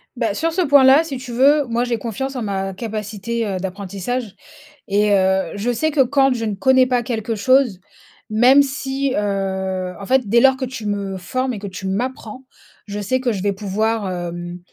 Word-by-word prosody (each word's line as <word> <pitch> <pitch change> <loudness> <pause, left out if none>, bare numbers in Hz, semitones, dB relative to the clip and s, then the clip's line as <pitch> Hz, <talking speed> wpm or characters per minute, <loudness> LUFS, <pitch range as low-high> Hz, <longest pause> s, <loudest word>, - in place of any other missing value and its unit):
Bah, 230 -4 -1
sur 325 +9 -1
ce 360 +3 0
point 285 -5 +5
là, 270 +4 +6
si 290 -5 -5
tu 250 -1 -8
veux, 280 +4 +4
moi 240 0 -1
j'ai 245 -1 -1
confiance 265 +4 -4
en 250 - -3
ma 195 -2 -3
capacité, 215 +1 -4
heu, 195 -3 -2
d'apprentissage 195 +4 -4 0.5
et 205 +1 +2
heu, 190 0 +2
je 215 +5 -1
sais 315 +7 0
que 290 -2 +3
quand 270 +1 +3
je 230 -2 -3
ne 210 -2 -2
connais 260 +5 +4
pas 250 -1 +1
quelque 225 -1 -3
chose. 245 -2 +2 0.5
Même 245 +6 +6
si, 275 -1 -2
heu, 190 -2 -2
en - - -6
fait 255 0 +2
dès 235 +4 +4
lors 265 0 +5
que 260 - -2
tu 250 -3 -7
me 200 -2 -3
formes 255 +7 -2
et 215 - -5
que 200 - -6
tu 190 0 -6
m'apprends, 245 +4 -4 0.4
je 205 0 -5
sais 230 +6 0
que 250 -2 0
je 200 -4 -3
vais 200 -1 +1
pouvoir, 210 +1 -1
hem, 175 0 -5
225 Hz, 205 wpm, -20 LUFS, 195-260 Hz, 0.5 s, là